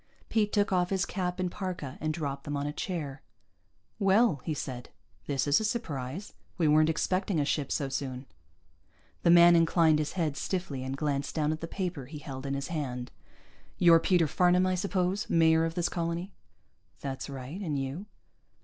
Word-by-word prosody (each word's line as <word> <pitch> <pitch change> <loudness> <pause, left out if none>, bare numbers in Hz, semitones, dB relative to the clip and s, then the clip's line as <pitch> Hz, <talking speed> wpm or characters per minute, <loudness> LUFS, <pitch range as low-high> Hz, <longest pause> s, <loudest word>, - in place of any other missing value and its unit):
Pete 210 -2 +1
took 205 -1 +1
off 180 -1 +2
his 190 -1 +1
cap 180 -1 -3
and 180 -1 -1
parka 175 -9 -5
and 155 +1 0
dropped 140 -3 -4
them 145 0 -2
on 140 - -2
a 145 - -3
chair. 150 -6 -4 0.8
"Well," 195 - +3
he 155 - -2
said. 125 -3 -6 0.4
"This 135 -2 0
is 145 0 +4
a - - -3
surprise. 180 - -3 0.2
We 165 -4 +2
weren't 155 +1 +5
expecting 185 +2 0
a 145 - +1
ship 140 -1 -1
so 140 - 0
soon." 130 -1 -4 1.0
The - - +3
man 175 0 +8
inclined 165 -2 +4
his 150 - -2
head 160 -6 -1
stiffly 155 -8 -3
and 130 +1 -4
glanced 140 -1 -2
down 155 -1 +1
at 155 - -4
the 165 - -4
paper 180 -7 -4
he 150 +2 -8
held 140 -2 -7
in 135 - -1
his 140 0 -4
hand. 125 -6 -4 0.7
"You're 170 -2 +7
Peter 175 -1 +3
Farnam, 180 +4 +3
I 185 - +1
suppose? 185 +1 -1
Mayor 160 -1 +4
of 165 0 -3
this 175 -1 +1
colony?" 170 +3 -3 0.7
"That's 135 0 -5
right. 135 +7 -7
And 155 -7 -2
you?" 140 +9 -4
160 Hz, 185 wpm, -29 LUFS, 140-180 Hz, 1.0 s, man